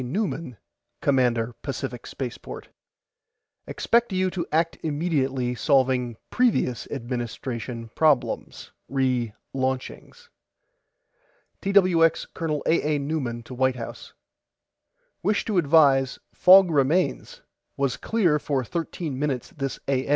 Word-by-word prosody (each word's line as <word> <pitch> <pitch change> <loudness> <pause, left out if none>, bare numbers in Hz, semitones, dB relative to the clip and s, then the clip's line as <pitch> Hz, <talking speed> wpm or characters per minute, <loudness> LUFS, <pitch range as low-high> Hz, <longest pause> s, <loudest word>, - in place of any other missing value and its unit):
NEUMAN 160 - -3 0.4
COMMANDER 125 -4 +2
PACIFIC 135 -3 -5
SPACEPORT: 125 -3 -7 1.0
EXPECT 235 -1 +1
YOU 185 0 +1
TO 175 -2 -3
ACT 165 +2 +1
IMMEDIATELY 140 -5 -1
SOLVING 130 -3 +1
PREVIOUS 230 - +1
ADMINISTRATION 120 -2 -5
PROBLEMS 155 -5 0 0.2
RE 130 -4 0 0.2
LAUNCHINGS 130 - -4 1.3
TWX 185 -5 +3
COL. 155 -4 -2
A. 155 -2 +2
A. - - +1
NEUMAN 140 -5 -3
TO 125 - -10
WHITE 130 0 +1
HOUSE: 115 -2 -8 1.1
WISH 205 +3 +1
TO 205 -5 +1
ADVISE 140 -4 +4 0.2
FOG 185 -1 +7
REMAINS 165 - +1 0.4
WAS 140 -2 0
CLEAR 180 -10 +1
FOR 140 -3 -1
THIRTEEN 160 -2 -4
MINUTES 140 -4 -2
THIS 135 -2 -4
A. 135 -1 0
140 Hz, 105 wpm, -25 LUFS, 125-165 Hz, 1.3 s, FOG